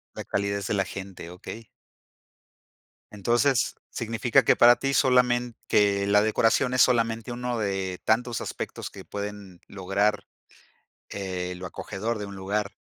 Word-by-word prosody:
La - - -5
calidez 100 0 -2
de - - -1
la 100 -1 +2
gente, 95 -3 -8
okey. 110 +5 -9 1.4
Entonces, 120 +5 +1
significa 115 +3 +1
que - - +4
para 120 0 +8
ti 135 0 -2
solamen 125 -2 +3
que 100 -1 +3
la 105 0 +5
decoración 115 +4 +2
es 130 - +4
solamente 115 -1 +2
uno 120 0 -3
de 95 -3 -2
tantos 115 +1 +1
aspectos - - -5
que - - -12
pueden 100 -3 -7
lograr, 100 +2 0 0.9
eh, 90 -2 -4
lo 90 - -7
acogedor 105 +5 -4
de 105 - -4
un 100 - -9
lugar 100 +2 -2
105 Hz, 140 wpm, -26 LUFS, 100-120 Hz, 1.4 s, para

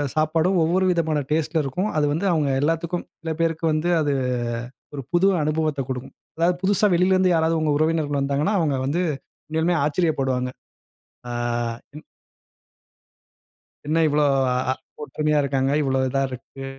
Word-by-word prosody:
சாப்பாடும் 160 +4 +2
ஒவ்வொரு 180 +4 +2
விதமான 160 -3 0
டேஸ்ட்ல 155 +1 +1
இருக்கும். 180 +10 -2
அது 150 - +3
வந்து 165 +6 -2
அவுங்க 150 -4 +1
எல்லாத்துக்கும் 165 +3 -1 0.2
சில 160 -1 -3
பேருக்கு 165 0 0
வந்து, 155 +3 0
அது 145 -2 +1 0.8
ஒரு 140 - -4
புது 175 +3 +4 0.2
அனுபவத்த 155 -1 0
குடுக்கும். 130 0 -5 0.2
அதாவது 175 +2 +2
புதுசா 200 +2 +3
வெளிலருந்து 185 +1 +3
யாராவது 160 0 +2
உங்க 155 - +1
உறவினர்கள் 155 -2 0
வந்தாங்கன்னா, 140 +8 0
அவுங்க 145 -5 +1
வந்து, 160 +6 0 0.5
உண்மையாலுமே 160 +2 +1
ஆச்சரியப்படுவாங்க. 135 -6 0 0.8
ஆ - - -4 0.6
இன் 150 - -9 1.8
என்ன 160 +2 +1
இவ்ளோ 150 0 +2 0.3
அ 130 +1 0 0.3
ஒற்றுமையா 150 0 0
இருக்காங்க? 135 -1 0
இவ்ளோ 135 -2 0
இதா 135 +1 0
இருக்கு? 130 +2 -9
155 Hz, 135 wpm, -23 LUFS, 140-170 Hz, 1.8 s, புது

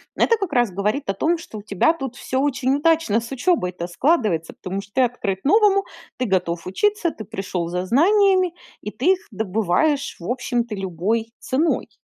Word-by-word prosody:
Это 460 - +3
как 390 -7 -4
раз 240 -5 +2
говорит 210 +9 -1
о 195 - +1
том, 330 - +1
что 275 -10 -9
у - - -9
тебя 210 - +2
тут 270 -6 -6
всё 260 - -2
очень 275 -1 +1
удачно 320 -8 +2
с 235 - -9
учебой 265 - +1
то 175 -1 -5
складывается. 205 - +1 0.2
Потому 195 +1 -2
что 200 +1 -17
ты 260 - +4
открыт 215 -6 -1
новому, 395 +4 +4 0.3
ты 255 - -1
готов 175 -5 -1
учиться, 350 - 0
ты 220 - -9
пришёл 185 -3 -4
за 180 +1 -2
знаниями 370 - +4 0.3
и 210 - -5
ты 325 - +3
их 370 - -8
добываешь, 220 - 0
в 170 - -7
общем-то, 240 -2 -2
любой 195 +5 -2
ценой. 305 +6 0
245 Hz, 185 wpm, -22 LUFS, 195-325 Hz, 0.3 s, ты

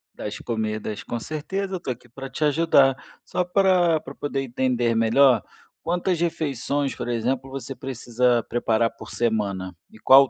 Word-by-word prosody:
Das 105 - -5
comidas. 110 -2 -3
Com 120 - -4
certeza, 190 - -3
eu - - -3
tô 150 - -3
aqui 125 0 -9
pra 135 +3 -8
te 135 +4 -3
ajudar. 145 -3 +4 0.3
Só 180 - 0
pra 180 -3 +3
pra 135 - -10
poder 140 -1 -2
entender 120 -2 0
melhor, 120 +3 +5 0.4
quantas 175 +1 0
refeições, 145 -4 -1
por - - -5
exemplo, 125 +3 -1
você 135 0 -6
precisa 125 -2 0
preparar 115 -1 +2
por - - -10
semana, 100 -6 -1
e - - -16
qual 135 +4 +8
o - - -12
130 Hz, 165 wpm, -24 LUFS, 115-150 Hz, 0.4 s, qual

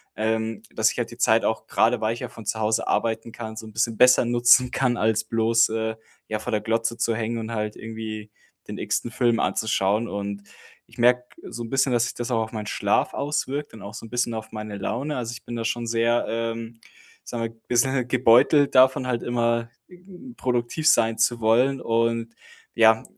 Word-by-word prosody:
ähm, 110 0 -1
dass 110 0 +2
ich - - -12
halt 120 -1 -2
die 120 - -11
Zeit 115 -1 +3
auch, 110 - -1
grade 115 +1 +2
weil 110 +1 0
ich 120 - -8
ja 125 - -5
von 115 -2 -12
zu 110 - -2
Hause 110 +1 0
arbeiten 115 0 -1
kann, 110 -1 -7
so 110 - -7
'n 110 - -13
bisschen 115 0 0
besser 125 +2 +6
nutzen 120 +1 +4
kann, 125 -1 +1
als 110 -1 +1
bloß, 115 +1 +3
äh, 110 0 -2 0.3
ja, 110 - -2
vor 115 +3 -5
der 105 -1 0
Glotze 115 +1 -1
zu 115 0 0
hängen 115 +1 -2
und 110 0 -5
halt 105 -1 -3
irgendwie 110 -1 -7 0.4
den - - -5
x-ten 120 - -2
Film 120 -3 +1
anzuschauen 105 +1 0
und 100 -1 -5 0.4
ich - - -19
merke 125 +1 +4 0.3
so 120 0 -6
'n 115 - -7
bisschen, 135 0 +2
dass 120 -1 +3
sich - - -4
das 120 0 -4
auch 115 - +1
auf 110 - -8
meinen 105 -2 -5
Schlaf - - 0
auswirkt 145 0 -2
und 110 - -11
auch 100 - -9
so 115 - -8
'n - - -12
bisschen 120 0 -1
auf 110 0 -7
meine 105 -2 -6
Laune. 130 +9 -3
Also 120 -1 -3
ich 115 -1 -10
bin 120 - -6
da 115 -1 -3
schon 120 +1 -2
sehr, 115 +1 +1
ähm, 115 0 -4 0.4
sagen 120 -1 -5
wir, 115 - -2 0.2
bissel 125 +1 +2
gebeutelt 130 +4 +4
davon, 130 0 +5
halt 120 -2 -1
immer 115 -1 0 0.7
produktiv 125 +5 -1
sein 115 -6 +4
zu 120 -1 +2
wollen. 125 +5 +3
Und, 115 0 0 0.4
ja, 110 -1 +5
115 Hz, 205 wpm, -24 LUFS, 110-120 Hz, 0.7 s, besser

